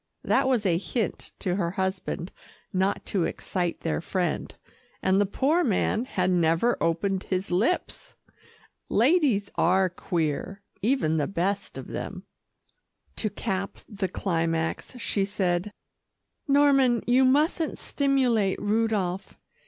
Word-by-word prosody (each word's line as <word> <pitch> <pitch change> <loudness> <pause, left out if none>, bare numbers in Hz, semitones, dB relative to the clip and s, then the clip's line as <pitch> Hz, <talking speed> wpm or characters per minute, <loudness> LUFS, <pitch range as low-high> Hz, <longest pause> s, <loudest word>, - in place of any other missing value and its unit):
That - - +2
was 245 -5 +1
a 170 -3 +2
hint 210 +5 -3
to 185 -2 -1
her 170 -4 0
husband 190 -1 -3 0.4
not 190 +2 0
to 185 -5 0
excite 175 -3 -3
their 165 -1 -1
friend, 175 -1 -2 0.5
and 190 +1 +3
the 205 - +2
poor 300 - +2
man 220 - +1
had 185 -7 0
never 170 +6 +3
opened 185 +4 0
his 185 0 -2
lips. 220 - -1 0.7
Ladies 245 - +3
are 185 +2 +3
queer, 175 +3 -2 0.2
even 210 - +1
the 145 -2 +1
best 195 +2 -2
of - - -6
them. - - -6 0.9
To 215 - -1
cap 195 -1 -3
the 195 -2 -3
climax, 165 +3 -2
she 230 -4 -1
said, 190 -1 -1 0.8
"Norman, 275 -4 +4
you 250 +2 +4
mustn't 300 +5 +2
stimulate 250 -8 +1
Rudolph. 205 -3 -1
195 Hz, 120 wpm, -26 LUFS, 180-240 Hz, 0.9 s, Norman